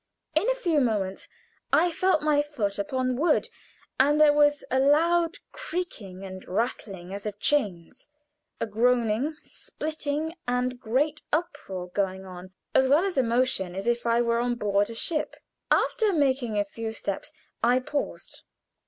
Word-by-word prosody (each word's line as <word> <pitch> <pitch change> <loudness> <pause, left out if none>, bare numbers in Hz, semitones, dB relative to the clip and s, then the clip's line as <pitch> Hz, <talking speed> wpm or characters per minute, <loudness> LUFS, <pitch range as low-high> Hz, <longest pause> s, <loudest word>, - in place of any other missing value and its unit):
In - - +2
a - - +2
few 345 -11 +1
moments 205 -6 -1 0.4
I 350 - +4
felt 370 -2 +2
my 300 -1 +3
foot 225 -10 -3
upon 255 +4 -1
wood, 310 +2 +2 0.5
and 290 +3 +4
there 300 -1 +7
was 290 0 +3
a 260 - +3
loud 330 +4 +3
creaking 230 - -5
and 185 -1 -8
rattling, 195 -3 -3
as 200 +1 -5
of 205 -1 -5
chains, 205 - -1 0.5
a - - 0
groaning, 235 +5 +1
splitting, 310 0 -4
and 250 0 0
great 285 +7 0
uproar 195 - -3
going 190 0 -2
on, 185 0 -10 0.2
as 265 - +4
well 295 +7 +4
as 390 - -2
a 265 - +4
motion 235 -7 0
as 195 - -4
if 235 0 0
I 235 +1 +3
were 235 0 +1
on 240 0 0
board 205 -2 +1
a 230 - -7
ship. 305 +6 -2 0.3
After 435 -2 +2
making 260 - +1
a 205 - +2
few 220 +2 -5
steps 200 +6 -4 0.3
I 245 +2 +4
paused. 285 +3 -5
250 Hz, 155 wpm, -27 LUFS, 205-295 Hz, 0.5 s, there